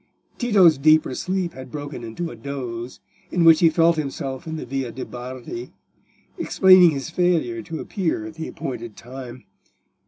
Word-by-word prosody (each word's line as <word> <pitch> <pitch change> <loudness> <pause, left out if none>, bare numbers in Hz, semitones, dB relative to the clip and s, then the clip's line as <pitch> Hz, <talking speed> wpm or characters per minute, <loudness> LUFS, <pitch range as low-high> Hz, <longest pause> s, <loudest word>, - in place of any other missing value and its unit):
Tito's 190 - +5
deeper 155 -1 +4
sleep 185 +2 -2
had 130 0 -10
broken 145 -4 -6
into 140 +10 -5
a - - -9
doze, 120 -1 -6 0.3
in 175 - +2
which 165 -1 +7
he 165 - +6
felt 165 +1 +3
himself 135 -2 -4
in 160 - -4
the 155 - -5
Via 130 -1 -3
de' 130 - -6
Bardi, 125 0 -8 0.7
explaining 185 -2 +6
his 145 0 -4
failure 165 -10 +1
to 160 +9 -7
appear 165 - -2
at 110 - -8
the 160 0 -6
appointed 120 -4 -6
time. 125 0 -9
140 Hz, 160 wpm, -23 LUFS, 125-165 Hz, 0.7 s, which